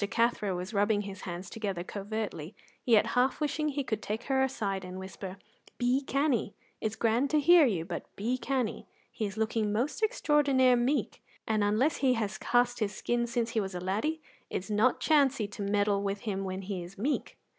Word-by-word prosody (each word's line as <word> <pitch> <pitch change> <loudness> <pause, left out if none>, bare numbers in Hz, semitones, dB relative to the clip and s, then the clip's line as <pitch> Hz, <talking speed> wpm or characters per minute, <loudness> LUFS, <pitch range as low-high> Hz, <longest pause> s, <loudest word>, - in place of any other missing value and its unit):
Cathro 230 -5 +1
was 180 +4 -5
rubbing 205 +1 +2
his 195 -1 -8
hands 175 +2 -5
together 195 -4 -3
covertly, 200 -4 -5 0.3
yet 230 -4 +5
half 250 +1 +2
wishing 305 0 0
he 285 -1 -2
could 220 -4 -2
take 220 +3 -3
her 265 -1 +1
aside 205 -8 -1
and 185 0 -7
whisper: 190 0 -7 0.4
"Be 245 +3 +2
canny; 275 -6 0 0.2
it's 220 0 -2
grand 235 +5 +2
to 305 - +3
hear 330 0 +7
you, 175 -8 -1
but - - -5
be 240 +5 -1
canny; 255 -5 -2 0.2
he 215 - -2
is 200 +2 -8
looking 220 -1 0
most 245 - -1
extraordinar 280 - +3
meek, 250 +5 0 0.3
and 215 -1 +2
unless 220 +9 +2
he 260 -2 +3
has 205 -4 -2
cast 245 0 +2
his 210 -3 -1
skin 240 +3 0
since 230 -1 -1
he 225 - +1
was 190 -3 -3
a - - -2
laddie, 220 - -1 0.3
it's 190 +3 -4
not 220 +5 +3
chancey 275 -8 +3
to 205 - -8
meddle 200 0 +1
with 200 0 -2
him 195 -3 -3
when 190 +1 -4
he 190 -1 -4
is 175 +4 -10
meek." 275 +9 -2
220 Hz, 190 wpm, -30 LUFS, 200-260 Hz, 0.4 s, hear